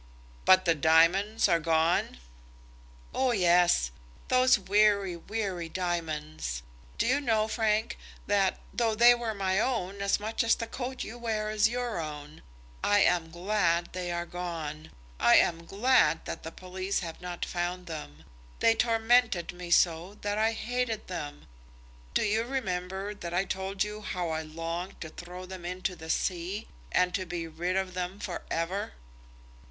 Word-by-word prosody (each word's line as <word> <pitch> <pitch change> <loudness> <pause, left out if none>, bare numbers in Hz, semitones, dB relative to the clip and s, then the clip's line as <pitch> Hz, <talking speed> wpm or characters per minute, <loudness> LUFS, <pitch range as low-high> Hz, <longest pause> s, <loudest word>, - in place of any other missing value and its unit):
"But 185 0 +6
the 170 - +5
diamonds 165 +9 +4
are 170 -3 +3
gone?" 165 - +1 1.0
"Oh 260 -2 +2
yes; 175 - +4 0.4
those 255 0 +5
weary, 200 -2 +3
weary 185 -2 -4
diamonds. 155 - -3 0.3
Do - - +1
you 270 +4 +2
know, 220 -5 +2
Frank, 220 -1 0 0.3
that, 195 -2 +2
though 225 -2 +1
they 240 +2 +8
were 235 -2 -3
my 190 -1 +1
own, 200 -5 -1
as 200 +1 +2
much 220 +2 -1
as 230 - +4
the 230 - -4
coat 255 +3 -5
you 240 +2 -8
wear 215 -2 -2
is 215 +1 +3
your 240 -4 -2
own, 150 -1 -7 0.4
I 205 0 +4
am 175 -3 +3
glad 175 -1 0
they 180 -1 -3
are 170 0 -2
gone. 165 -4 -5 0.3
I 120 - +6
am 165 -1 +3
glad 210 -5 +3
that - - -5
the 165 - -7
police 185 +3 -3
have 165 -1 -7
not 180 -1 -4
found 180 +1 -3
them. 115 - -8 0.4
They 230 - +5
tormented 225 -5 +2
me 175 0 -8
so 175 +3 +2
that 205 0 -1
I 220 +1 +2
hated 235 -2 -2
them. 145 - -6 0.7
Don't - - +3
you 215 +2 +1
remember 195 -5 -3
that 175 -4 -6
I 190 +2 +2
told 190 +1 -2
you 210 0 -6
how 180 -4 -3
I 160 0 -1
longed 165 +4 -5
to 160 - -5
throw 180 +3 -9
them 185 -1 -9
into 180 +1 -3
the 160 -1 -10
sea, 180 +4 -1 0.2
and 180 0 +2
to 185 -1 -2
be 175 -1 -3
rid 170 +3 -2
of 190 -1 -1
them 180 +2 -4
for 180 -4 -4
ever?" 170 - -2
185 Hz, 160 wpm, -29 LUFS, 170-215 Hz, 1.0 s, they